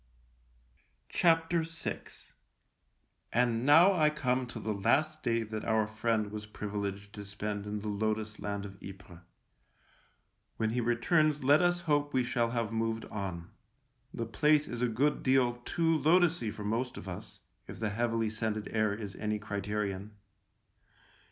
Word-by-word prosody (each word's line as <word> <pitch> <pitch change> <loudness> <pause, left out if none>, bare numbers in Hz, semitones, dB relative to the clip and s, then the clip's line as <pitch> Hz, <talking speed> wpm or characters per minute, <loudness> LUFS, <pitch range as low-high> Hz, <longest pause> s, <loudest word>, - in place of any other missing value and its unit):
VI 165 -2 +4 1.9
And 120 -1 +2
now 165 +7 +8
I 155 -4 +4
come 130 -4 0
to 115 - -7
the 110 - -2
last 155 +10 +1
day 115 -3 +1
that 110 0 -5
our 110 -1 +2
friend 110 -1 -1
was 105 0 -6
privileged 100 -1 -5
to 105 - -7
spend 105 0 -4
in 105 0 -3
the 105 - -5
lotus 110 +1 -2
land 100 0 -3
of 100 -1 -11
Ypres. 95 -3 -11 1.4
When 110 0 0
he 120 +1 0
returns 145 +6 +2
let 145 +4 +5
us 175 0 +2
hope 145 -3 0
we 130 - +3
shall 120 -1 0
have 115 -2 -2
moved 115 0 -1
on 95 -5 -5 0.3
— - - -44
the - - -3
place 150 0 +3
is 120 0 -5
a 125 - +3
good 135 +6 +1
deal 130 -2 +3
too 165 -1 +1
lotussy 160 -5 +3
for 105 - -7
most 115 +5 -2
of - - -8
us, 90 -2 -8 0.3
if - - -9
the 110 -2 -1
heavily 115 0 0
scented 110 -1 -3
air 110 -2 +1
is 105 -3 -6
any 105 0 -1
criterion. 105 -1 -3
110 Hz, 150 wpm, -31 LUFS, 105-130 Hz, 1.9 s, now